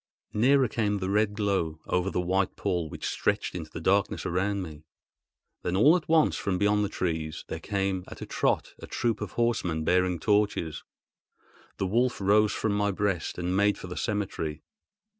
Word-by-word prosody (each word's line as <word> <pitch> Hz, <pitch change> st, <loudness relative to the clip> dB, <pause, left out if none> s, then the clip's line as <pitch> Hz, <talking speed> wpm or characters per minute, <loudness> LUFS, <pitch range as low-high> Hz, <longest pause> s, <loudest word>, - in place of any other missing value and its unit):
Nearer 130 Hz, +4 st, +4 dB
came 105 Hz, -2 st, 0 dB
the 95 Hz, 0 st, -2 dB
red 105 Hz, 0 st, +2 dB
glow, 95 Hz, -7 st, 0 dB
over 90 Hz, +1 st, 0 dB
the 90 Hz, -, -1 dB
white 95 Hz, +2 st, 0 dB
pall 90 Hz, -5 st, -1 dB
which -, -, -7 dB
stretched -, -, 0 dB
into -, -, -6 dB
the -, -, -7 dB
darkness -, -, +1 dB
around 100 Hz, +2 st, 0 dB
me. 75 Hz, -3 st, -9 dB, 0.8 s
Then 90 Hz, -, -1 dB
all 145 Hz, -, +6 dB
at 170 Hz, -4 st, -3 dB
once 160 Hz, -1 st, +4 dB
from 95 Hz, -2 st, -1 dB
beyond 105 Hz, +1 st, +2 dB
the 100 Hz, -, -1 dB
trees 80 Hz, -5 st, -3 dB
there 80 Hz, -, -4 dB
came 95 Hz, 0 st, -1 dB
at -, -, -10 dB
a -, -, -5 dB
trot -, -, 0 dB
a -, -, -9 dB
troop 115 Hz, -3 st, -1 dB
of 105 Hz, -, -5 dB
horsemen 95 Hz, -9 st, 0 dB
bearing 90 Hz, +1 st, +2 dB
torches. 100 Hz, -7 st, +1 dB, 0.9 s
The -, -, -1 dB
wolf 120 Hz, +6 st, +1 dB
rose 105 Hz, +2 st, +4 dB
from 110 Hz, -, -1 dB
my 105 Hz, 0 st, +1 dB
breast 100 Hz, -3 st, -1 dB
and 90 Hz, +1 st, -1 dB
made 100 Hz, +1 st, +3 dB
for -, -, -8 dB
the 90 Hz, 0 st, -6 dB
cemetery. 90 Hz, -8 st, -3 dB
100 Hz, 180 wpm, -28 LUFS, 90-105 Hz, 0.9 s, all